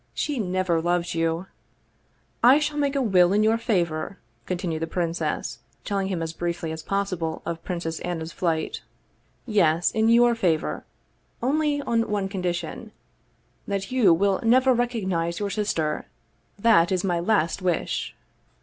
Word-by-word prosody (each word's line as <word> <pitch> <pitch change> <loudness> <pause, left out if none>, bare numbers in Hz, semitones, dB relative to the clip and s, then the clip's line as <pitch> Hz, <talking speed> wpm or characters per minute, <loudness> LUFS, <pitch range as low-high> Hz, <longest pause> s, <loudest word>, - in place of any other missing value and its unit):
She 290 -4 -1
never 185 -4 0
loved 175 0 0
you! 165 +1 -1 0.3
" - - -41
" - - -41
I 255 +4 +8
shall 300 0 -1
make 285 -1 0
a 275 - +1
will 185 -4 +4
in 210 +1 +3
your 220 +1 +3
favor," 175 -4 -1 0.3
continued 175 -3 -2
the 165 - -1
prin 170 -1 -1
cess, 170 - -3 0.3
telling 195 -1 -1
him 180 -4 -2
as 160 0 -4
briefly 170 -1 -3
as 160 0 -5
possible 185 -3 -2
of 165 0 -4
Princess 170 -3 -4
Anna's 165 -2 -4
flight. 165 -4 -2 0.4
" - - -40 0.2
Yes, 175 -7 +2
in 220 0 +2
your 240 +1 +5
favor 175 -9 -1 0.6
only 290 +2 +1
on 230 -2 0
one 200 -2 -1
condition: 180 -3 -4 0.7
that 200 +2 -3
you 245 -8 +5
will 190 +3 +2
never 255 +3 +4
recognize 190 -9 -1
your 205 -1 -2
sister. 165 -8 -1 0.5
That 200 -5 +4
is 185 -1 0
my 175 -3 0
last 180 -1 +1
wish!" 180 -3 -1
185 Hz, 160 wpm, -25 LUFS, 170-225 Hz, 0.7 s, I